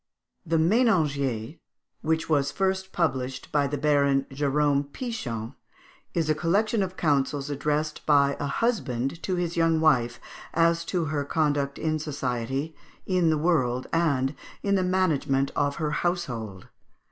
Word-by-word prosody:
The 165 +1 +2
"Ménagier," 155 - +1 0.4
which 160 +1 0
was 145 -3 +2
first 190 0 -1
published 130 -6 -2
by 145 -2 +2
the 145 +1 -3
Baron 140 -2 +2
Jérôme 140 0 +1
Pichon, 130 - -4 0.6
is 165 -2 +1
a 155 - +3
collection 200 +8 +1
of 185 -1 -3
counsels 145 -2 0
addressed 150 +2 -1
by 140 -2 +4
a 145 - -2
husband 140 - -1
to 185 - -1
his 175 -1 -2
young 165 -1 +3
wife, 125 -7 +2 0.4
as 170 0 +3
to 175 -3 -1
her 145 -2 0
conduct 145 -2 0
in 155 0 -1
society, 135 0 -3 0.3
in 180 -3 +2
the 155 - +2
world, 130 -6 +1
and 145 -5 +1 0.3
in 200 - +1
the 195 - +3
management 160 -7 +1
of 145 -1 +1
her 155 -2 -2
household. 125 - -3
150 Hz, 140 wpm, -26 LUFS, 140-170 Hz, 0.6 s, by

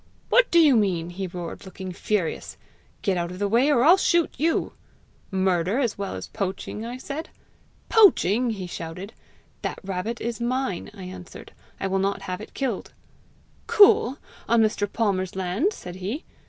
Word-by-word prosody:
'What - - +5
do 340 - +3
you 305 -6 +7
mean?' 180 -6 +1
he 190 +2 -4
roared, 175 -1 -7
looking 190 -1 -7
furious. 180 -1 -2 0.5
'Get 195 -3 +1
out 170 0 -1
of 180 - -7
the 205 +1 0
way, 235 +7 +3
or 260 -5 +4
I'll 340 +6 +7
shoot 345 -3 +2
you.' 320 +4 0 0.6
'Murder 190 +1 +1
as 245 -6 0
well 200 -1 -4
as - - -5
poaching!' 200 +1 -4
I 240 +2 -5
said. 285 +5 -6 0.6
'Poaching!' 250 - +5
he 200 -5 -4
shouted. 180 +4 -7 0.5
'That - - -3
rabbit 195 +5 -3
is 235 +1 -4
mine,' 250 -6 -1
I 195 - -9
answered; 185 -1 -10 0.3
'I - - -2
will 195 0 0
not 195 +1 -1
have 185 +2 -4
it 215 - -11
killed.' 255 -7 -3 0.7
'Cool! 345 - +6 0.3
on 230 -1 +5
Mr. 205 -2 0
Palmer's 190 -5 0
land!' 190 - 0
said 180 - -9
he. 205 - -4
205 Hz, 165 wpm, -25 LUFS, 185-250 Hz, 0.7 s, you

